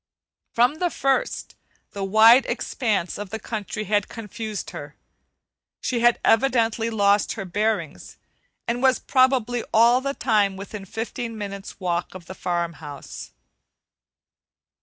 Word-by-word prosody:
From 250 +7 +3
the 355 - +1
first, 275 - -1 0.4
the 200 - -5
wide 220 +6 +6
expanse 210 -9 -2
of 205 -2 -6
the 220 - -4
country 215 -1 -5
had 205 0 0
confused 220 -1 -6
her; - - -9 0.8
she 245 - -1
had 240 0 +4
evidently 230 -2 +2
"lost 205 -2 +2
her 195 - -6
bearings" 210 +4 -2 0.5
and 240 +1 -1
was 260 -1 +4
probably 255 -3 +2
all 235 +3 +5
the 275 +1 -3
time 205 -5 +1
within 200 0 -8
fifteen 230 +2 -5
minutes' 200 -2 -7
walk 175 -1 -2
of 180 -2 -10
the 190 - -8
farm 170 -2 -2
house. 145 -3 -9
220 Hz, 130 wpm, -23 LUFS, 200-240 Hz, 0.8 s, wide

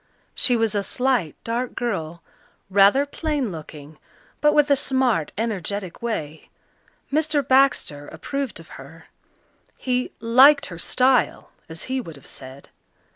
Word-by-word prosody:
She 250 - +3
was 225 -2 +1
a 205 - 0
slight, 245 - 0
dark 235 +2 -3
girl, 170 -9 -4 0.5
rather 200 +8 +5
plain 290 - -2
looking, 155 -2 -10 0.4
but 295 0 +5
with 295 -1 +3
a - - +7
smart, 260 - 0
energetic 200 -4 -4
way. 160 -10 -5 0.6
Mr. 305 -1 +1
Baxter 260 - +2
approved 275 -8 -5
of 165 - -14
her; 150 +5 -15 0.7
he 250 -1 -1
"liked 270 +5 +6
her 170 - -9
style," 255 +3 +1 0.2
as 160 0 -6
he 260 0 -2
would 165 -9 -10
have 140 - -16
said. 130 +1 -11
230 Hz, 130 wpm, -23 LUFS, 165-265 Hz, 0.7 s, a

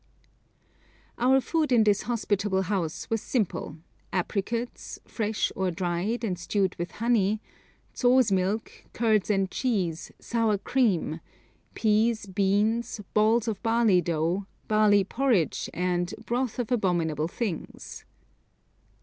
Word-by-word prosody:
Our 260 +2 +4
food 310 +1 -1
in 235 -3 +5
this 205 -2 +3
hospitable 205 -4 0
house 180 -5 -2
was 225 -1 +1
simple 215 -9 -2 0.3
apricots, 215 +6 -3
fresh, 220 -2 -1
or 190 -1 0
dried 180 +7 -2
and 185 -6 -2
stewed 190 +1 0
with 175 +1 -5
honey; 220 -3 +1 0.6
zho's 250 -3 +4
milk, 195 +3 0 0.2
curds 220 -4 +2
and 195 -2 +1
cheese, 185 -10 -1
sour 225 -3 0
cream, 195 -9 0 0.6
peas, 220 0 +2
beans, 205 +4 0
balls 220 +2 +3
of 220 -3 -2
barley 225 -5 +3
dough, 170 +4 -1 0.2
barley 210 -2 +4
porridge, 220 - 0
and 175 0 -1
'broth 245 0 -1
of 245 -1 -3
abominable 170 -9 +1
things.' 190 -1 -5
210 Hz, 115 wpm, -27 LUFS, 185-230 Hz, 0.6 s, in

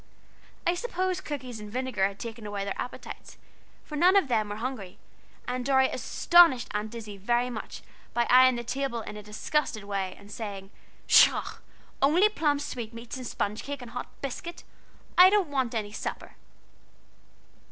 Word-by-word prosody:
I 345 - +3
suppose 370 -2 -2
cookies 260 -8 -6
and 210 -1 -9
vinegar 250 -5 0
had 200 0 -9
taken 225 -1 -7
away 200 -1 -3
their 200 - -3
appetites, 250 - -8 0.5
for 300 - -8
none 360 +6 +5
of 385 -9 +4
them 215 -3 +1
were 205 - -4
hungry, 220 -5 -5 0.5
and 250 0 -2
Dorry 265 0 +3
astonished 340 -8 +4
Aunt 210 +2 -3
Izzie 215 -3 -7
very 240 +5 0
much 220 - -7 0.3
by 240 0 +3
eyeing 255 0 +7
the 240 - -4
table 260 -1 -2
in 210 - -8
a 210 - -7
disgusted 215 +2 -2
way, 195 -2 -3
and 200 +1 -15
saying: 200 -3 -6 0.3
"Pshaw! - - +5 0.4
only 335 +10 +5
plum 300 -8 +1
sweatmeats 230 -3 -6
and 255 -2 -6
sponge 210 0 -2
cake 280 -2 -6
and 235 - -10
hot 245 - -5 0.2
biscuit! 335 +6 -5 0.6
I 365 +1 +10
don't 400 -5 +2
want 260 -4 -1
any 210 -2 -2
supper." - - -6
245 Hz, 165 wpm, -28 LUFS, 210-285 Hz, 0.6 s, I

